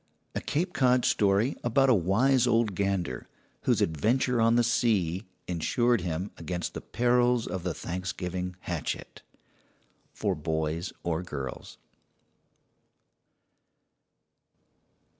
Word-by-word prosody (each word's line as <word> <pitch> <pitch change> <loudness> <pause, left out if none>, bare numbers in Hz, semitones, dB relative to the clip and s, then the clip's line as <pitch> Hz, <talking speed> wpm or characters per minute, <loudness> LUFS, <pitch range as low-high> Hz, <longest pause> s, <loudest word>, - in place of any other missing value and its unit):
A - - -2
Cape 170 +5 -1
Cod 125 -2 +3
story 105 +6 +2
about 135 +3 +3
a 130 - +6
wise 115 +7 +3
old 115 -3 +2
gander 95 -8 -2 0.4
whose - - +3
adventure 115 - +1
on 115 +1 +4
the 120 - +4
sea 105 -6 +1 0.2
insured 120 +7 +1
him 90 +3 -3
against 85 +1 -4
the - - -5
perils 120 0 +2
of 90 +1 -4
the 90 -1 -3
Thanksgiving 90 0 -4
hatchet. - - -4 0.9
For - - -1
boys 80 +2 -2
or 85 -1 -1
girls. 70 -7 -6
100 Hz, 105 wpm, -28 LUFS, 85-120 Hz, 0.9 s, a